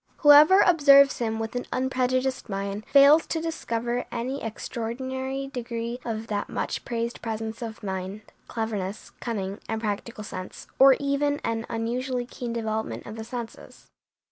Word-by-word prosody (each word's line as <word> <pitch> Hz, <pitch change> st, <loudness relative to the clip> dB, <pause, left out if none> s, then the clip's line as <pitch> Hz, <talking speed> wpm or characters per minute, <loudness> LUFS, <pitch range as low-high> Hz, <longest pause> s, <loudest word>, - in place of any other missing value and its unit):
Whoever 300 Hz, +6 st, +8 dB
observes 280 Hz, -5 st, +6 dB
him 225 Hz, -2 st, -1 dB
with 225 Hz, +1 st, -4 dB
an 245 Hz, -, -3 dB
unprejudiced 255 Hz, 0 st, 0 dB
mind 200 Hz, +1 st, -4 dB
fails 285 Hz, +3 st, +6 dB
to 325 Hz, -, -1 dB
discover 240 Hz, -7 st, -2 dB
any 255 Hz, +4 st, -3 dB
extraordinary 260 Hz, +4 st, -4 dB
degree 235 Hz, 0 st, -4 dB
of 225 Hz, -1 st, -4 dB
that 205 Hz, -2 st, -3 dB
much -, -, -3 dB
praised 235 Hz, -1 st, -3 dB
presence 225 Hz, 0 st, -4 dB
of 225 Hz, -1 st, -7 dB
mind, 190 Hz, +1 st, -4 dB, 0.3 s
cleverness, 215 Hz, -3 st, -4 dB
cunning, 200 Hz, -4 st, -4 dB
and 220 Hz, 0 st, -1 dB
practical 215 Hz, +1 st, -4 dB
sense, 185 Hz, -2 st, -8 dB
or 270 Hz, 0 st, +8 dB
even 285 Hz, +1 st, 0 dB
an 225 Hz, 0 st, -2 dB
unusually 245 Hz, +2 st, -2 dB
keen 240 Hz, -1 st, -6 dB
development 220 Hz, -1 st, -3 dB
of 215 Hz, -, -8 dB
the 220 Hz, -, -6 dB
senses. 235 Hz, 0 st, -9 dB
235 Hz, 145 wpm, -26 LUFS, 220-265 Hz, 0.3 s, Whoever